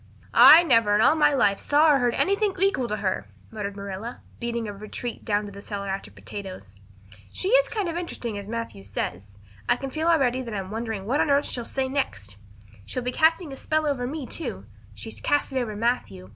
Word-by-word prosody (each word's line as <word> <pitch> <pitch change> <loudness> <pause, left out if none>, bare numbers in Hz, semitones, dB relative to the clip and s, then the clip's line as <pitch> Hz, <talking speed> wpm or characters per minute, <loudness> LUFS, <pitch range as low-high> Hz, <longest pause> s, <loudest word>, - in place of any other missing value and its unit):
"I 330 +3 +10
never 230 -9 +4
in 210 - +3
all 265 - +6
my 300 -2 +4
life 205 -8 +2
saw 300 +2 +4
or 280 - +4
heard 245 -2 +1
anything 400 0 +1
to 375 - -8
equal 390 -11 +1
her," 200 -3 -2 0.2
muttered 205 -2 -5
Marilla, 200 +4 -7 0.2
beating 235 -1 -3
a 205 - -5
retreat 215 +4 -6
down 205 -1 0
to 205 - -8
the 200 0 -10
cellar 200 -1 -5
after 195 +1 -4
potatoes. 185 - -9 0.5
"She 375 - -3
is - - +5
kind 420 -6 -2
of 335 - -3
interesting 295 -10 -4
as 200 -1 -6
Matthew 230 - -5
says. 100 0 -5 0.3
I 240 - +5
can 270 +2 -6
feel 315 +4 -2
already 260 -7 +3
that 230 -4 -6
I'm 190 -1 -5
wondering 220 -3 -4
what 265 +7 +1
on - - +1
earth 280 0 +3
she'll 240 -2 -4
say 265 +2 -2
next. 105 - -3 0.5
She'll 245 - -5
be 250 - -2
casting 320 +1 +2
a - - -6
spell 310 +3 -1
over 265 -4 -1
me, 290 +1 -5
too. 240 - -5 0.3
She's 105 +1 -8
cast 290 -1 +1
it 260 - +1
over 225 -4 -3
Matthew. 205 - -2
235 Hz, 215 wpm, -25 LUFS, 200-290 Hz, 0.5 s, I